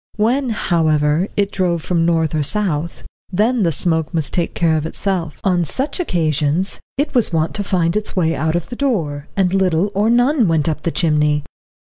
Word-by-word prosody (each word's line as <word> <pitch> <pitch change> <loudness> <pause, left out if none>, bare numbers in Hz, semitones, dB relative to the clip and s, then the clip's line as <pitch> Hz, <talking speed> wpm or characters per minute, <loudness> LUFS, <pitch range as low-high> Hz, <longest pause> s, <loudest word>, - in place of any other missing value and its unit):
When, 245 +5 +1
however, 160 -4 +1
it 200 -1 +1
drove 175 -4 -1
from 170 -2 +1
north 165 -2 +1
or 155 - 0
south, 170 -2 -2 0.3
then 220 +6 +1
the 170 -4 +2
smoke 160 +1 0
must 155 -3 +1
take 175 - -1
care 165 -2 +2
of 155 0 -1
itself. 170 -4 -2
On 180 -2 +2
such 265 - -2
occasions 165 - 0 0.2
it 285 +2 -1
was 245 -6 +3
wont 160 -1 0
to 205 - -2
find 175 -3 0
its 210 0 -2
way 165 -3 +1
out 160 +2 -1
of 175 - -3
the 245 - -6
door, 165 - -2
and 185 -2 +2
little 190 0 +1
or 205 +3 +1
none 245 0 +3
went 160 -3 +1
up 155 -1 -1
the - - -1
chimney. 150 -3 +1
170 Hz, 190 wpm, -18 LUFS, 160-205 Hz, 0.3 s, was